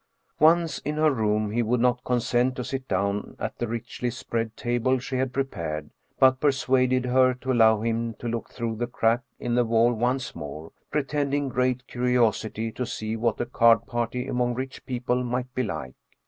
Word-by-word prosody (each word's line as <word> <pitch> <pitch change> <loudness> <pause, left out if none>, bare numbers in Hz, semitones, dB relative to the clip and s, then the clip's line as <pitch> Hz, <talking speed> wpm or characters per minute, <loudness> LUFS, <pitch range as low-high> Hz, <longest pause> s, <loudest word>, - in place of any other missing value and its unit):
Once 160 -1 +4
in 150 - -3
her 155 0 +3
room 105 -4 0
he 120 +2 +1
would 120 +2 +1
not 125 0 +2
consent 125 +1 +1
to 125 - -3
sit 130 +1 -4
down 100 +1 -1
at - - -5
the 120 - -1
richly 120 +2 -3
spread 115 -1 -4
table 120 +2 +1
she 130 +1 -5
had 130 0 0
prepared, 85 - -3 0.3
but 130 0 +5
persuaded 130 -2 +2
her 130 0 +4
to 130 +1 -3
allow 110 -3 +5
him 115 0 -1
to 120 - -7
look 115 0 -3
through 115 -2 -3
the 120 +2 -2
crack 115 +1 +1 0.2
in 120 - -2
the 120 0 +4
wall 115 +1 +3
once 125 +3 -1
more, 75 +3 -7 0.2
pretending 145 -1 0
great 125 0 0
curiosity 115 -3 0
to 125 - -4
see 110 -2 -3
what 115 -1 0
a 120 - 0
card 115 -1 +4
party 120 +1 -2
among 125 -2 0
rich 130 +1 -5
people 125 0 -1
might 125 +1 -3
be 130 - 0
like. 80 - -4
120 Hz, 185 wpm, -26 LUFS, 115-130 Hz, 0.3 s, but